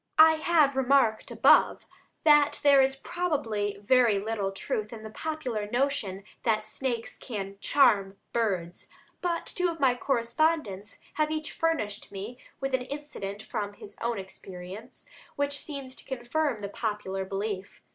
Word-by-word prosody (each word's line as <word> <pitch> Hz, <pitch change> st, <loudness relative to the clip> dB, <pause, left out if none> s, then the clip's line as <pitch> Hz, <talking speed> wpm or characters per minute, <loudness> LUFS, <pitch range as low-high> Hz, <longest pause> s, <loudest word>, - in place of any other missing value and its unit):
I 315 Hz, 0 st, +8 dB
have 310 Hz, -4 st, +3 dB
remarked 265 Hz, -4 st, +3 dB
above -, -, +4 dB, 0.4 s
that 295 Hz, -2 st, +5 dB
there 280 Hz, -1 st, +7 dB
is 265 Hz, 0 st, +2 dB
probably 235 Hz, -, -2 dB
very 235 Hz, 0 st, +4 dB
little 205 Hz, -1 st, -2 dB
truth 210 Hz, +2 st, -3 dB
in 225 Hz, -2 st, -8 dB
the 220 Hz, -, -8 dB
popular 250 Hz, -8 st, -3 dB
notion 240 Hz, -6 st, 0 dB, 0.2 s
that 215 Hz, -2 st, +1 dB
snakes 235 Hz, +1 st, -3 dB
can 200 Hz, -4 st, -6 dB
"charm" 205 Hz, -9 st, +3 dB, 0.2 s
birds. 185 Hz, -7 st, -1 dB, 0.3 s
But 345 Hz, -2 st, -1 dB
two 360 Hz, -1 st, 0 dB
of 330 Hz, -1 st, -5 dB
my 265 Hz, -3 st, +4 dB
correspondents 235 Hz, -4 st, 0 dB, 0.2 s
have 305 Hz, +1 st, +1 dB
each 310 Hz, 0 st, -3 dB
furnished 270 Hz, -12 st, -1 dB
me 205 Hz, +5 st, -7 dB, 0.2 s
with 270 Hz, -1 st, -3 dB
an 260 Hz, -, +2 dB
incident 250 Hz, -7 st, -6 dB
from 205 Hz, -1 st, -4 dB
his 205 Hz, -, -10 dB
own 235 Hz, -1 st, 0 dB
experience, 190 Hz, +3 st, -9 dB, 0.3 s
which 285 Hz, 0 st, 0 dB
seems 275 Hz, -4 st, -6 dB
to -, -, -11 dB
confirm 265 Hz, +1 st, -1 dB
the 200 Hz, -, -4 dB
popular 205 Hz, -3 st, -3 dB
belief. 195 Hz, 0 st, -4 dB
235 Hz, 145 wpm, -28 LUFS, 205-285 Hz, 0.4 s, I